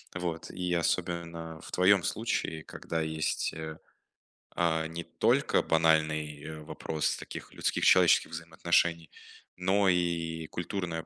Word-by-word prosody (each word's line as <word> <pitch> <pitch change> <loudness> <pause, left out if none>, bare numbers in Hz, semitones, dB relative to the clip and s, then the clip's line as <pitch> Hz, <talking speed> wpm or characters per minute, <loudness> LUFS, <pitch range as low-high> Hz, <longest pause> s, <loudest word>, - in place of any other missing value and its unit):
Вот, 85 -2 -4
и 90 -1 -2
особенно 85 -1 -2
в - - -11
твоем 95 0 +4
случае, 95 -8 -2
когда 80 0 -4
есть, 80 -1 -1
э, 80 0 -6 0.8
а, 80 -2 +1
не 85 +1 -6
только - - +2
банальный 80 -1 +1
вопрос 75 0 -2
таких - - -9
людских - - 0
человеческих - - +5
взаимоотношений, 85 0 0 0.5
но 95 +2 +3
и 85 -2 0
культурная 85 -2 -4
80 Hz, 115 wpm, -30 LUFS, 80-85 Hz, 0.8 s, человеческих